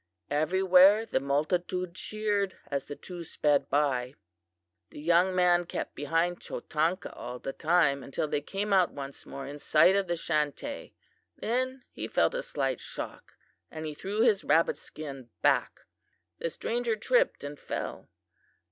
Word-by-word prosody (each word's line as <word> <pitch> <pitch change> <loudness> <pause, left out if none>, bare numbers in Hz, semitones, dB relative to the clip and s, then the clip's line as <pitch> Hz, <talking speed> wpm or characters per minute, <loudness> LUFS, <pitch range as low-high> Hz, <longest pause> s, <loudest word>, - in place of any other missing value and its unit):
Everywhere 185 +7 +5
the - - 0
multitude 170 +6 -1
cheered 205 -1 -1
as 140 -1 -2
the 145 - -6
two 175 +1 -8
sped 145 -3 +1
by. 135 -3 +1 0.7
"The - - -11
young 175 +4 +3
man 175 -1 +4
kept - - -4
behind 165 +4 0
Chotanka 165 +4 -2
all 125 +1 -6
the 135 +2 -5
time 155 -4 +2
until 135 +3 -3
they 145 - -1
came 200 +7 -3
once 145 -8 0
more 135 0 -6
in 145 +2 -7
sight 160 +6 +5
of 200 -1 +1
the 175 0 -1
Chantay. 155 - -2 0.4
Then 255 +2 -1
he - - -5
felt - - +2
a - - -1
slight 135 - -2
shock - - -8 0.4
and 160 0 -6
he 155 - -4
threw 200 +8 -2
his 225 -4 +4
rabbit 165 +1 +3
skin 135 -5 -9
back. - - +2 0.6
The 165 - -1
stranger 235 +6 -1
tripped - - +2
and 145 0 -6
fell. - - -5
170 Hz, 145 wpm, -29 LUFS, 145-195 Hz, 0.7 s, Everywhere